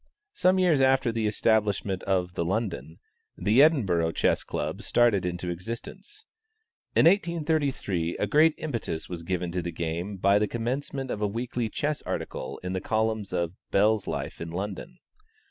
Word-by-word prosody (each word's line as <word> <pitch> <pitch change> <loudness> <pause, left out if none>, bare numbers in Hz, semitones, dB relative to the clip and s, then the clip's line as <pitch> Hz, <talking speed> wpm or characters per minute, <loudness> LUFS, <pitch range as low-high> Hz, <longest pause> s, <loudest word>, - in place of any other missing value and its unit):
Some 185 +1 +3
years 175 -7 +3
after 130 -2 +3
the 115 -1 -1
establishment 105 -3 +1
of 90 -2 0
the 85 - -1
London, 85 - -3 0.4
the 110 +6 +4
Edinburgh 95 - +3
Chess - - +1
Club - - -4
started 110 -7 +3
into 90 0 -3
existence. 115 - -7 0.7
In - - +5
1833, 155 - +1
a - - 0
great 155 +8 +4
impetus 115 - -4
was 85 -2 -5
given 90 0 -2
to 90 +1 -1
the 85 0 -4
game 85 +4 -3
by 100 +2 +4
the 105 - +1
commencement 130 +4 -3
of 105 - -4
a 105 - +2
weekly 115 +2 -3
chess 150 +5 -2
article 65 - -5
in 90 0 -3
the 95 - -2
columns 110 -1 -1
of 85 -1 -1 0.2
"Bell's 105 +1 +2
Life - - -4
in 85 - -4
London." 100 - -5
105 Hz, 160 wpm, -27 LUFS, 90-130 Hz, 0.7 s, In